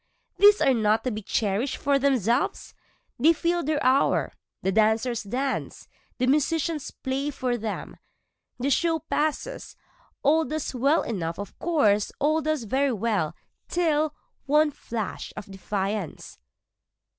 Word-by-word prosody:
Away! 405 - +9
these 415 0 +6
are 270 - +4
not 220 -1 +2
to 255 - -1
be 215 0 -4
cherish'd 215 +5 -1
for 280 -1 +1
themselves, 255 -3 0 0.5
They 315 +7 +6
fill 340 +2 0
their 305 +1 0
hour, 265 +2 +2 0.3
the 190 - +1
dancers 220 +3 +2
dance, 260 +6 -3 0.3
the 255 - +1
musicians 305 +2 +1
play 270 +2 -3
for 255 -3 -2
them, 220 -2 -5 0.6
The 270 +3 -1
show 330 +4 +2
passes, 315 +9 -3 0.5
all 315 +3 +4
does 310 -2 -3
well 275 +5 +2
enough 170 -7 -3
of 205 +1 -7
course, 215 -12 +2
All 310 +2 +2
does 310 -3 -1
very 265 +5 +1
well 205 -7 -1 0.3
till 310 -3 +1 0.3
one 300 +1 +4
flash 225 -6 -5
of - - -6
defiance. 195 - -4
265 Hz, 135 wpm, -26 LUFS, 220-305 Hz, 0.6 s, Away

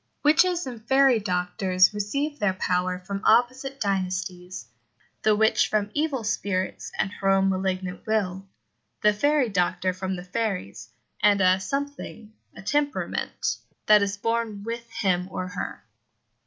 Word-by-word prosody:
Witches 345 +4 +4
and 240 -4 -8
fairy 265 -3 +5
doctors 185 0 +2
receive 280 +9 -2
their 190 -2 +1
power 180 -1 0
from 195 +2 -6
opposite 260 +4 +2
dynasties; 185 - -3 0.6
the 215 -1 +4
witch 220 +1 +3
from 210 -1 -1
evil 290 -5 -1
spirits 200 -3 -2
and 195 - 0
her 195 -1 -1
own 195 0 +4
malignant 185 +1 -3
will; 195 -3 -1 0.6
the 210 0 +5
fairy 285 +4 +2
doctor 185 -2 0
from 190 +1 -3
the 180 - -7
fairies, 185 - -3 0.3
and 205 0 +5
a 185 0 +4
something 275 -2 -5 0.2
a - - -10
temperament 290 +7 -1 0.3
that 210 -1 +6
is 200 0 -1
born 230 -1 -2
with 235 +1 -5
him 185 -5 0
or 185 -1 -4
her. 180 - -6
205 Hz, 140 wpm, -25 LUFS, 185-230 Hz, 0.6 s, that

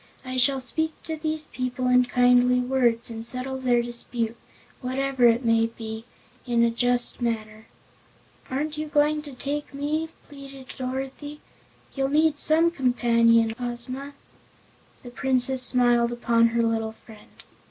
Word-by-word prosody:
I 255 0 -5
shall 265 +2 +3
speak 315 +5 -2
to 320 - -4
these 310 0 -3
people 255 0 -3
in 250 0 +4
kindly 250 0 +4
words 245 -2 0
and 225 0 -6
settle 255 +2 -3
their 245 -2 +2
dispute 235 -1 -3 0.5
whatever 260 -1 +1
it 235 +2 +2
may 230 0 +3
be 225 -1 -8 0.4
in 235 -1 +2
a 235 - +3
just 245 +1 0
manner." 220 -2 -3 0.8
"Aren't 300 +3 -3
you 310 - -3
going 300 +1 +2
to 290 -2 -10
take 285 +2 -5
me?" 305 +3 -2 0.2
pleaded 275 -2 -11
Dorothy. 270 +3 -5 0.5
"You'll 270 -1 -1
need 305 0 +2
some 325 +2 +4
companion, 230 -5 +3
Ozma." 255 +3 -3 0.9
The 245 - -10
Princess 260 +1 0
smiled 240 -2 +3
upon 235 -1 +2
her 230 0 0
little 225 -1 -1
friend. 220 -1 -17
250 Hz, 140 wpm, -25 LUFS, 235-275 Hz, 0.9 s, in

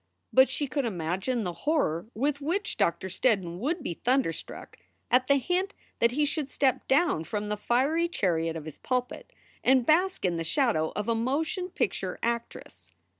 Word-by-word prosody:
But 260 +1 +6
she 290 - -1
could 275 +1 -1
imagine 190 +5 -1
the 180 -2 -3
horror 185 - 0
with 285 +5 0
which 350 +8 -1
Doctor 170 +2 0
Steddon 185 -4 0
would 305 - -1
be 175 - -2
thunderstruck 250 - -1 0.3
at 250 +1 +4
the 280 - +5
hint 360 +8 0 0.2
that 235 - +5
he 295 +3 +2
should 290 -1 -2
step 270 -2 +1
down 275 - +3
from 210 +4 -3
the 210 - 0
fiery 270 +10 +1
chariot 165 - 0
of 160 -2 -6
his 155 - -9
pulpit 250 - -2 0.3
and 260 -1 +4
bask 360 - +2
in 175 -2 +1
the 165 - -2
shadow 165 - +1
of 210 +1 -2
a 230 - +2
motion 315 - -1
picture - - -2
actress. 235 0 -4
255 Hz, 175 wpm, -28 LUFS, 190-295 Hz, 0.3 s, But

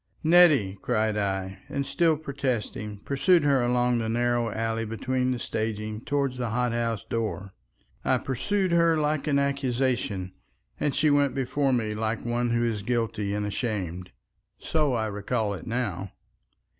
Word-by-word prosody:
"Nettie!" 155 - +5
cried 110 -3 +1
I, 95 -2 -2
and 140 0 -2
still 160 +3 +2
protesting, 125 -8 -3
pursued 165 +5 +3
her 140 -3 +3
along 120 0 +2
the 110 -1 -2
narrow 120 0 +1
alley 115 +1 -1
between 125 +4 -1
the 125 - 0
staging 110 -1 -3
toward 140 -2 0
the 125 -2 -3
hot 125 +1 0
house 115 -2 -1
door. 105 -4 -3 0.5
I - - +3
pursued 185 +8 -1
her 170 -1 +4
like 150 -1 0
an 140 -2 +3
accusation, 130 -8 0 0.5
and 145 - 0
she 155 -1 +3
went 145 -1 +3
before 135 +1 0
me 110 -4 0
like 110 +1 -2
one 120 0 0
who 120 0 +1
is 110 -3 -1
guilty 115 -2 -1
and 105 0 -1
ashamed. 95 -5 -3 0.5
So 150 -4 0
I 110 -2 0
recall 105 +1 -1
it 95 - -8
now. 100 -6 -2
120 Hz, 155 wpm, -27 LUFS, 110-140 Hz, 0.5 s, Nettie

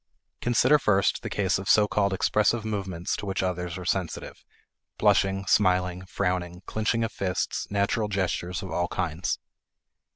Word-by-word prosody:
Consider 125 +5 +4
first 100 -6 +2
the - - -5
case 95 -2 0
of 95 - -5
so 105 -1 +6
called 100 -1 +1
expressive 105 +3 +1
movements 95 -5 -2
to 100 - -6
which 95 0 -1
others 90 -1 -2
are 90 - -7
sensitive; 90 -1 -3 0.5
blushing, 95 0 +2
smiling, 90 -2 +2
frowning, 90 -2 -2
clinching 110 +1 0
of 115 - -2
fists, 95 -4 -2
natural 100 +2 0
gestures 95 -2 -2
of 95 - -7
all 85 +1 0
kinds. 85 -1 -2
95 Hz, 150 wpm, -26 LUFS, 90-105 Hz, 0.5 s, so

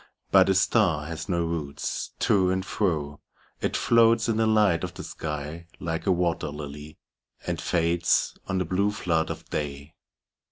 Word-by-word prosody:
'But - - +6
a 95 - +3
star 90 -6 +2
has 80 +3 -6
no 85 -2 +1
roots: 80 -4 -4
to 95 -3 +3
and 95 +1 -1
fro 75 -9 -1 0.4
It - - 0
floats 115 -1 +4
in 115 -2 +1
the 110 0 +2
light 105 -6 +3
of - - -5
the - - -7
sky, 75 +2 -6
like 80 +2 -3
a - - +5
wat«r 85 -3 0
]ily. 75 +1 -8 0.5
And 85 -1 -2
fades 85 0 +1
on 95 - -1
the 90 - 0
blue 95 +4 +1
flood 85 -6 0
of - - -6
day. 75 +1 -4
85 Hz, 165 wpm, -26 LUFS, 75-95 Hz, 0.5 s, But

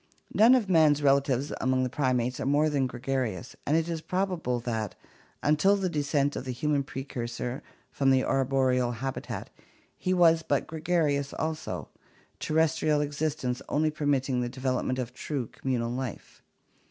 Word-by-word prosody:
None 230 +4 +7
of 235 -6 +1
man's 155 -5 +4
relatives 140 -1 +2
among 130 0 +2
the - - +1
primates 125 -2 0
are - - -2
more 150 +2 +3
than 135 -3 +1
gregarious, 125 -3 -3
and 155 - +3
it 165 0 0
is 165 -2 -3
probable 180 -9 -1
that, 110 -4 -3 0.5
until 155 +7 +4
the 190 -2 -1
descent 145 -2 0
of - - -4
the 130 - -4
human 145 +3 0
precursor 125 -2 -5 0.3
from 135 -1 +1
the 130 -1 +4
arboreal 130 -2 +1
habitat, 130 +3 -5 0.4
he 185 - -2
was 165 -3 +5
but 145 -4 0
gregarious 155 -4 0
also; 160 0 -3 0.5
terrestrial 155 -1 +2
existence 145 -3 -2
only 155 +1 +1
permitting 140 -4 0
the 120 - -2
development 130 0 -1
of 125 -1 -4
true 135 0 -3
communal 120 -1 -2
life. 130 0 -6
140 Hz, 150 wpm, -28 LUFS, 130-155 Hz, 0.5 s, None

